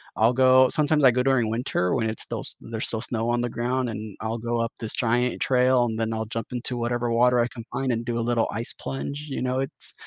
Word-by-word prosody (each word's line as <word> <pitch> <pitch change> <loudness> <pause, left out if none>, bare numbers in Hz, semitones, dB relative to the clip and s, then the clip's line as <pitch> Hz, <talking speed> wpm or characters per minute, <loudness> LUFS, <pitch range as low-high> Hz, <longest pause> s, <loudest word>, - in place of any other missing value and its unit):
I'll 115 +3 +3
go 130 0 +6
sometimes 150 -1 +2
I 130 - +8
go 125 +1 +1
during 130 -5 +2
winter 115 -6 0
when 110 -3 0
it's 110 - -2
still - - -4
s - - -3
there's 115 0 -3
still 110 -1 -2
snow 115 -1 -1
on 120 0 +1
the 120 - -1
ground 125 +2 -1
and 110 -1 -7
I'll 110 +1 -2
go 120 +1 -2
up 115 0 -2
this 110 -1 -4
giant 125 +1 0
trail 125 -1 +3
and 110 -1 -3
then 115 0 -1
I'll 110 0 -2
jump 115 0 -4
into 125 0 -2
whatever 120 0 -1
water 125 +1 +4
I 120 - +2
can 115 -2 -9
find 135 -1 -1
and 115 0 -1
do 120 0 -2
a - - 0
little 115 -1 +1
ice 115 +2 -2
plunge, 140 +2 -5
you 135 - -3
know, 130 0 0
it's 135 - -3
120 Hz, 255 wpm, -25 LUFS, 115-125 Hz, -, I